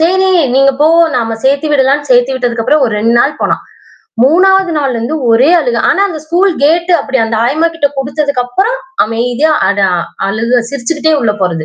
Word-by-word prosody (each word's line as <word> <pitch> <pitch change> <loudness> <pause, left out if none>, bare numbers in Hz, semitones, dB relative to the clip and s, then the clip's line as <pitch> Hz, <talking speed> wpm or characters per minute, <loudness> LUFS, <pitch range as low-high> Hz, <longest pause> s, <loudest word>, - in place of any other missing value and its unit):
சரி, 375 +3 +2 0.2
நீங்க 275 +1 +3
போ! 300 - +4 0.3
நாம் 225 -2 -3
சேர்த்து 275 +3 +1
விடலான்னு 280 +1 +1
சேர்த்தி 245 +1 +3
விட்டதுக்கு 245 -3 -2
அப்புறம் 300 -1 +2
ஒரு 225 - -3
2 230 +2 +1
நாள் 290 +5 0
போனான். - - -1 0.6
3வது 370 +5 +3
நாள்ல 275 -4 -1
இருந்து 235 +7 -3
ஒரே 245 +6 +3
அழுக 245 -7 -1
ஆனா - - +1
அந்த 315 -5 -6
ஸ்கூல் 355 +5 +1
கேட் 335 +4 +2
அப்பிடி 265 -1 -3
அந்த 225 0 -3
ஆயம்மாக்கிட்ட 315 +3 0
குடுத்ததுக்கு 280 -1 -2
அப்புறம் 390 - -1 0.3
அமைதியா 245 +7 -1 0.2
அடா 200 -1 +1 0.4
அழுக 230 +4 0
சிரித்துக்கிட்டே 295 +4 -2
உள்ள 220 -3 0
போறது. 165 -3 -2
275 Hz, 170 wpm, -11 LUFS, 235-315 Hz, 0.6 s, போ